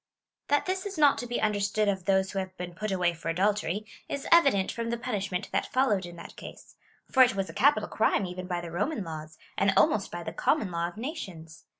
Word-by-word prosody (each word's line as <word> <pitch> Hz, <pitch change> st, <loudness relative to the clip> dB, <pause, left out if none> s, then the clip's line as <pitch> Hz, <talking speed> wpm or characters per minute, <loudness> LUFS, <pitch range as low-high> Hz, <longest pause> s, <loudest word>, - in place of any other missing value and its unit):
That 290 Hz, -, +2 dB
this 375 Hz, +1 st, -2 dB
is 390 Hz, -3 st, -7 dB
not 290 Hz, -2 st, +5 dB
to 245 Hz, -, -4 dB
be 240 Hz, -, -2 dB
understood 210 Hz, 0 st, +1 dB
of 190 Hz, -3 st, -1 dB
those 190 Hz, -1 st, +2 dB
who 195 Hz, -, -2 dB
have 185 Hz, -1 st, -6 dB
been 180 Hz, 0 st, -6 dB
put 215 Hz, +4 st, -4 dB
away 180 Hz, -2 st, +1 dB
for 165 Hz, 0 st, -6 dB
adultery, 200 Hz, +2 st, 0 dB, 0.2 s
is 280 Hz, -, -4 dB
evident 275 Hz, -, +5 dB
from 230 Hz, 0 st, -4 dB
the 235 Hz, -, -1 dB
punishment 200 Hz, -7 st, -3 dB
that 195 Hz, -, -1 dB
followed 210 Hz, -9 st, +2 dB
in 175 Hz, -, -10 dB
that 170 Hz, -, -11 dB
case; -, -, -11 dB, 0.4 s
for 260 Hz, -, +5 dB
it 250 Hz, -4 st, +6 dB
was 195 Hz, -1 st, -2 dB
a -, -, -17 dB
capital 250 Hz, -6 st, +3 dB
crime 220 Hz, -2 st, +1 dB
even 180 Hz, 0 st, -6 dB
by 175 Hz, -1 st, -2 dB
the 170 Hz, -1 st, -7 dB
Roman 210 Hz, -, -1 dB
laws, 155 Hz, -2 st, -8 dB, 0.2 s
and 195 Hz, 0 st, +4 dB
almost 205 Hz, -2 st, +3 dB
by 175 Hz, -, -6 dB
the 160 Hz, -, -5 dB
common 210 Hz, -, +1 dB
law 170 Hz, 0 st, -1 dB
of 175 Hz, -, -10 dB
nations. 185 Hz, -, -7 dB
195 Hz, 230 wpm, -28 LUFS, 175-235 Hz, 0.4 s, it